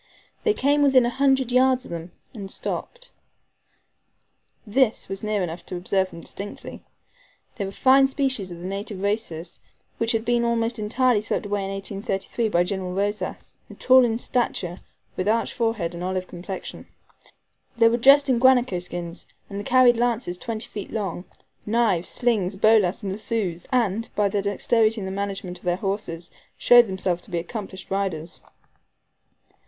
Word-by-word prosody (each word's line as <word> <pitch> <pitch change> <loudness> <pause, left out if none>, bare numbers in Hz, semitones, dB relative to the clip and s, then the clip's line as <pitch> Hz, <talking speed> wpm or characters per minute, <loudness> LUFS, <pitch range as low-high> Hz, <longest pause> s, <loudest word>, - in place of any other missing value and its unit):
They 430 -2 +2
came 290 -1 +2
within 265 -3 +5
a 240 - 0
hundred 265 -1 +2
yards 255 0 +3
of - - -11
them, 170 +1 -6 0.2
and 200 -5 -7
stopped. - - -5 1.5
This 235 +2 +1
was 195 0 -5
near 215 -2 -1
enough 170 0 -5
to - - -5
observe 190 +1 0
them 170 - -10
distinctly. 200 +4 -8 0.8
They 200 - -2
were 195 - -5
fine 270 +5 +5
specimens 265 -8 -2
of 175 - -8
the 175 - -9
native 195 0 -5
races, 200 -5 -3 0.4
which 230 0 +1
had 225 0 -1
been 240 0 +2
almost 230 0 0
entirely 235 +1 +2
swept 215 - -2
away 205 -1 -2
in - - -4
1833 195 +3 -3
by 175 -3 +3
General 185 -1 -4
Rosas, 205 +2 -3 0.2
tall 260 0 +6
in 225 -2 +1
stature, 195 -8 -2 0.3
with 185 - -2
arched 225 +1 +1
forehead 225 -8 -1
and 170 +1 -6
olive 185 0 -2
complexion. 185 +2 -7 0.9
They 230 -1 +6
were 230 +1 +2
dressed 280 +4 +6
in 255 -3 +2
guanaco 250 -7 +4
skins, 175 -1 -6 0.2
and 200 +1 -4
carried 255 -1 +5
lances 235 -6 -1
twenty 225 -1 -4
feet 205 -2 -7
long, 195 -4 -3 0.4
knives, 210 -6 +1
slings, 210 -6 0
bolas, 215 0 +3
and 195 - -2
lassos, 195 -4 -3
and, 230 -3 0
by 205 -1 +2
their 200 0 0
dexterity 220 +3 +1
in 195 - -5
the 190 - -4
management 195 -2 -4
of - - -25
their 175 0 +2
horses, 195 -4 -4 0.3
showed 240 -1 +7
themselves 190 -2 -2
to 205 - -11
be 175 - -2
accomplished 190 +1 -6
riders. 185 -5 -3
205 Hz, 160 wpm, -24 LUFS, 190-240 Hz, 1.5 s, showed